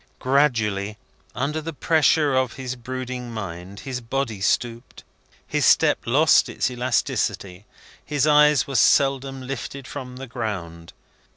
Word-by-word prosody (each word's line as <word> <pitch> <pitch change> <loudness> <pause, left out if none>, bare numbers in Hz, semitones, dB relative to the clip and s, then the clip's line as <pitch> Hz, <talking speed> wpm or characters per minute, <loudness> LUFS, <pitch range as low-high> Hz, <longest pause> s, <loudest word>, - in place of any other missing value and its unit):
Gradually, 110 -7 +1 0.4
under 150 +5 -2
the 165 +1 -6
pressure 155 -1 +2
of 130 -2 +1
his 130 -1 -5
brooding 125 0 -6
mind, 100 -2 -7
his 130 -2 -5
body 115 -3 -3
stooped, 115 +3 -2 0.4
his - - -1
step - - +4
lost - - +4
its 130 - -1
elasticity, 115 -5 -2 0.4
his 145 -1 0
eyes 150 -2 +5
were 140 - -7
seldom 135 +1 +2
lifted 135 +1 -6
from 125 -3 -7
the 135 +1 -7
ground. 95 -9 -6
125 Hz, 125 wpm, -23 LUFS, 110-135 Hz, 0.4 s, eyes